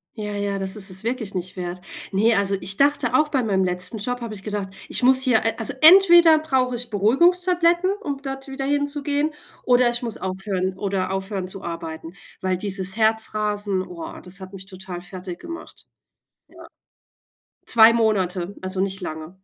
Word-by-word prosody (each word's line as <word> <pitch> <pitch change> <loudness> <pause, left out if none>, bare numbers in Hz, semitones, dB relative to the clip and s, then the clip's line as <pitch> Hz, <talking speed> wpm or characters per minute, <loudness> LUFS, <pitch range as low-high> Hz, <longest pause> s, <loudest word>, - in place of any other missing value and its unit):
Ja, 210 -2 -5
ja, 200 -1 -2
das 190 +1 -1
ist 200 -2 +1
es 190 +2 -1
wirklich 230 -3 -3
nicht 185 0 -5
wert. 180 0 -5 0.3
Ne, 220 +4 +3
also 200 -1 +2
ich 195 +1 -2
dachte 290 +1 +2
auch 305 -1 +3
bei 275 -3 0
meinem 195 -5 +1
letzten 180 +3 -1
Job 245 +4 -2
habe 230 -2 -6
ich 195 - -10
gedacht, 205 -2 -4 0.2
ich - - -1
muss 260 +1 +5
hier 250 -5 +2
a 225 - +2
also 225 +5 +5
entweder 345 -1 +8
brauche 265 -5 0
ich 240 0 -5
Beruhigungstabletten, 345 - +2
um 285 -9 -5
dort 270 -1 -6
wieder 270 0 -5
hinzugehen, 285 +1 -1 0.3
oder 245 -1 +4
ich 240 +1 -2
muss 230 -3 -4
aufhören 190 0 -3
oder 195 -2 -2
aufhören 190 0 -4
zu 190 +1 -9
arbeiten. 165 -1 -7 0.3
Weil 185 -1 -1
dieses 190 -1 +1
Herzrasen, 215 -3 0
oh, 180 -3 -8
das 180 +1 -6
hat 190 0 -11
mich 190 0 -10
total 185 -2 -8
fertig 180 0 -9
gemacht. 335 0 -10 0.6
Ja. - - -14 1.0
2 225 -1 +6
Monate, 195 -5 0
also 185 0 -2
nicht 195 0 -2
lange. 160 0 -8
205 Hz, 175 wpm, -22 LUFS, 190-260 Hz, 1.0 s, entweder